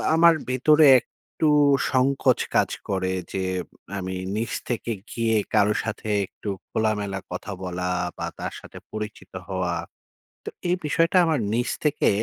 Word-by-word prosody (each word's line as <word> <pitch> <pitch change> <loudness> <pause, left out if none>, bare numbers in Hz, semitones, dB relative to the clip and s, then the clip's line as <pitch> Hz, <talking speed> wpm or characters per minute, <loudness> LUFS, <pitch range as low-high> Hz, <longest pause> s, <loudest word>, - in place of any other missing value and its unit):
আমার 170 +1 +7 0.2
ভেতরে 150 +5 +5
একটু 155 - -4 0.4
সংকোচ 135 +1 +3 0.2
কাজ - - +4 0.2
করে 95 -1 0 0.2
যে, 95 - -1 0.5
আমি 95 -1 -4 0.2
নিজ 115 +2 -2 0.2
থেকে 120 -1 -2 0.2
গিয়ে 115 -1 +1 0.2
কারো 105 +1 +4
সাথে 110 0 -5 0.2
একটু 100 - -8 0.2
খোলামেলা 105 -3 -1
কথা 90 +3 -5
বলা 90 0 -3 0.3
বা - - -3
তার - - -4
সাথে - - -13
পরিচিত 105 -3 -6 0.2
হওয়া। 90 -2 -1 0.7
তো - - -5 0.2
এই 180 - +3
বিষয়টা 165 +3 +2
আমার 160 -3 +1
নিজ 120 +2 0
থেকে 150 -1 +2
110 Hz, 135 wpm, -24 LUFS, 95-140 Hz, 0.7 s, আমার